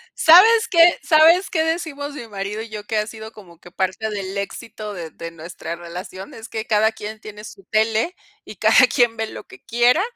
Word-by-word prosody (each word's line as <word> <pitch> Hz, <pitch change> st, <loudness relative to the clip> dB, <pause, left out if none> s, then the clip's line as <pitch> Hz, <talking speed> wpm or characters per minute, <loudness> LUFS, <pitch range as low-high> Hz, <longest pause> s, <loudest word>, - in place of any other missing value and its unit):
¿Sabes 440 Hz, +8 st, +6 dB
qué? 335 Hz, -, +1 dB, 0.2 s
¿Sabes 335 Hz, +4 st, +5 dB
qué 320 Hz, -3 st, 0 dB
decimos 315 Hz, -3 st, -3 dB
mi 255 Hz, -5 st, -8 dB
marido 205 Hz, +1 st, -5 dB
y 225 Hz, -, -9 dB
yo 210 Hz, -1 st, -7 dB
que 220 Hz, -, -2 dB
ha 210 Hz, +1 st, -1 dB
sido 220 Hz, 0 st, -10 dB
como 175 Hz, -6 st, -16 dB
que 175 Hz, -, -16 dB
parte 190 Hz, +4 st, -2 dB
del 200 Hz, -1 st, -5 dB
éxito 210 Hz, +1 st, -6 dB
de 165 Hz, -4 st, -8 dB
de 165 Hz, 0 st, -9 dB
nuestra 165 Hz, 0 st, -8 dB
relación? 180 Hz, +3 st, -9 dB
Es 220 Hz, -, -11 dB
que 220 Hz, 0 st, -5 dB
cada 220 Hz, 0 st, +2 dB
quien 215 Hz, 0 st, -8 dB
tiene 210 Hz, 0 st, -11 dB
su 195 Hz, -, -12 dB
tele, 220 Hz, +9 st, 0 dB, 0.3 s
y -, -, -10 dB
cada -, -, +5 dB
quien 240 Hz, -3 st, +2 dB
ve 225 Hz, -, -2 dB
lo -, -, -9 dB
que 390 Hz, -, -16 dB
quiera, 240 Hz, +7 st, +2 dB
220 Hz, 205 wpm, -20 LUFS, 195-275 Hz, 0.3 s, Sabes